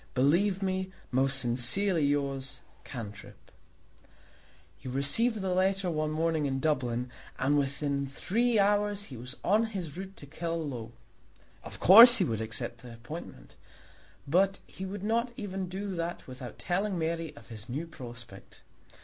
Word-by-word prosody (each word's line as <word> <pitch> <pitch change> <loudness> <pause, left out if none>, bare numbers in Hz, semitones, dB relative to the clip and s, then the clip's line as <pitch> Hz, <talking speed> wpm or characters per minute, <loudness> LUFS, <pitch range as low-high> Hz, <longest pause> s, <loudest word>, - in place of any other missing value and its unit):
Believe 180 +9 +2
me, 190 0 -2 0.2
Most 135 +1 +2
sincerely 135 +9 +2
yours, 140 -2 -1 0.2
CANTRIP. 110 -4 -10 1.3
He - - -10
received 195 - +2
the 190 -1 -1
letter 190 0 +1
one 155 -1 -1
morning 160 -1 0
in 135 -1 -2
Dublin, 125 -5 -1 0.3
and 140 +3 +1
within 140 0 -1
three 225 - 0
hours 205 0 +2
he 140 - -10
was 125 +4 -8
on 215 +4 +3
his 185 -9 -6
route 195 +1 -8
to - - -10
Killaloe. 150 -7 -5 0.7
Of - - -9
course 235 +7 +11
he 195 - +3
would 110 -6 -2
accept 115 +2 -3
the 120 0 -11
appointment, 120 +8 -10 0.7
but 195 +6 +2
he 190 0 -8
would 195 0 -6
not 235 +3 0
even 190 -3 -4
do 195 +1 -4
that 170 0 -4
without 130 -1 -9
telling 190 +2 -1
Mary 165 -1 -3
of 145 - -15
his 110 +1 -8
new 145 +7 -3
prospect. 120 -7 -11
160 Hz, 145 wpm, -29 LUFS, 135-195 Hz, 1.3 s, course